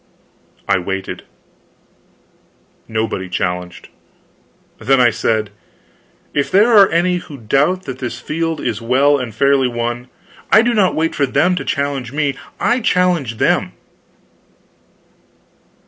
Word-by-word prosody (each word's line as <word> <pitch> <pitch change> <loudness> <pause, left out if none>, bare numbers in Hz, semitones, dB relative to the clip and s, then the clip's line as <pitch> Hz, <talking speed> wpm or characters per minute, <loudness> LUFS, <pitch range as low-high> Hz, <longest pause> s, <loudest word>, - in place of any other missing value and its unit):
I 95 - +2
waited. 95 +1 -5 1.6
Nobody 110 -4 -3
challenged. 90 0 -4 0.9
Then 135 0 +2
I 120 -1 +5
said: 110 -1 -1 0.8
"If 140 - 0
there 215 +4 +4
are 200 -2 +7
any 175 +2 +1
who 150 -5 -9
doubt 140 +11 +1
that 130 -4 -7
this 120 -1 -5
field 165 +4 -3
is 115 -5 -3
well 135 +5 +3
and 125 -3 -5
fairly 140 +1 +3
won, 120 +1 -3 0.4
I 220 - +7
do 240 0 +1
not 200 -5 +2
wait 165 +1 0
for 140 - 0
them 180 +7 +2
to - - -3
challenge 140 -4 -2
me, 145 -2 0 0.2
I 245 +2 +2
challenge 180 - +1
them." - - +1
135 Hz, 125 wpm, -17 LUFS, 115-170 Hz, 1.6 s, are